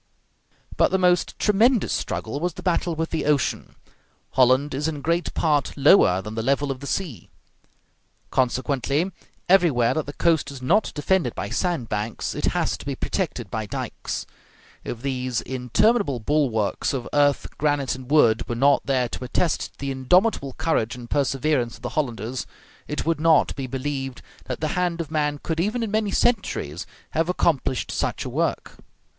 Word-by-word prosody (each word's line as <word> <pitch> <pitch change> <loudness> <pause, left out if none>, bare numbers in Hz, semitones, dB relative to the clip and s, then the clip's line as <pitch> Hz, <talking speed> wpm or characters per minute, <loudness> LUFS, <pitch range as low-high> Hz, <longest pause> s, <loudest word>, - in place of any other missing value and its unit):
But - - +4
the 190 - +2
most 180 -1 +2
tremendous 220 +2 +3
struggle 115 +6 -3
was 175 +1 -2
the - - -9
battle 175 -2 0
with 160 +1 -3
the 160 - -1
ocean. 145 -4 0 0.6
Holland 130 +3 +3
is 145 +3 -1
in 150 -3 -3
great 170 +2 0
part 150 -5 +1
lower 135 - +5
than 105 - -6
the 110 - -2
level 140 +3 +1
of 130 - -5
the 140 - -7
sea; 150 - -4 1.0
consequently, 135 +6 0 0.4
everywhere 165 -11 +4
that 155 -2 -2
the 145 - -5
coast 160 -4 +1
is 140 -2 -8
not 175 +12 +2
defended 150 -4 +1
by 100 +1 -4
sand 175 -10 -1
banks 105 +1 -3
it - - -2
has - - 0
to - - -10
be - - -2
protected - - -3
by - - -3
dikes. - - -4 0.6
If 120 +1 -6
these 130 -3 -1
interminable 135 - +1
bulwarks 120 -5 0
of 130 -3 -3
earth, 145 -1 +3
granite, 145 -3 +1
and 130 0 -9
wood 120 -7 +4
were 120 - -1
not 140 +4 +4
there 130 -3 +2
to 125 - -6
attest 165 +7 -1
the 140 0 -3
indomitable 135 - +2
courage 155 -9 0
and 120 -1 -10
perseverance 135 -2 +1
of 120 - -18
the 120 - -2
Hollanders, 125 -3 -3 0.4
it 150 - -3
would 165 -1 +1
not 160 -1 +4
be 135 -2 -4
believed 135 0 -4 0.2
that 130 +1 -5
the 155 - 0
hand 175 0 -1
of 160 -2 -4
man 150 -2 0
could, 160 -1 -2
even 215 +7 0
in 220 - -3
many 215 -1 +1
centuries, 190 - 0 0.2
have 165 +2 0
accomplished 150 -8 0
such - - -2
a - - -3
work. - - -2
145 Hz, 170 wpm, -24 LUFS, 125-165 Hz, 1.0 s, lower